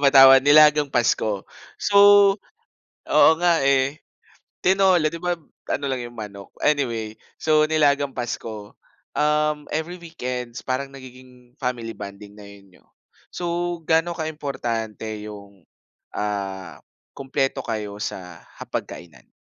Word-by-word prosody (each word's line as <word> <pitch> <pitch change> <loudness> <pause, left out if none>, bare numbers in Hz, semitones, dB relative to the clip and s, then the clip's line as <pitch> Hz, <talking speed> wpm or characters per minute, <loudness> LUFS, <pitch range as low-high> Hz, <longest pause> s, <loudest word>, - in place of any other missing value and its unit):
patawad. 135 -1 +8
Nilagang 150 +1 +6
Pasko. 110 -5 0 0.3
So, 200 -1 -1 1.1
oo - - +6
nga, 170 -3 +3
eh. 135 +1 +2 0.6
Tinola, 185 -3 +3
'di 170 +2 -5
ba, 175 0 +1 0.4
ano 140 - -2
lang 130 -2 -2
'yong 120 0 -10
manok? 100 -2 -9
Anyway, 115 -7 0 0.2
so 155 -1 +3
nilagang 145 -3 +2
Pasko, 110 -4 -6 0.4
um, 150 0 +1
every 160 +3 -3
weekends, 125 -8 -6
parang 135 +1 -3
nagiging 130 -1 -15
family 120 -4 -4
bonding 100 0 -10
na 105 - -13
'yon 100 -1 -15
niyo. - - -24 0.5
So, 175 0 -3
gaano 165 +1 +2
kaimportante 135 -9 -4 0.2
'yong, 100 -3 -11 0.5
ah, 95 -4 -4 0.3
kumpleto 135 0 -2
kayo 105 -3 -4
sa 90 -4 -6 0.2
hapag-kainan? 75 -8 -8
130 Hz, 115 wpm, -23 LUFS, 105-150 Hz, 1.1 s, patawad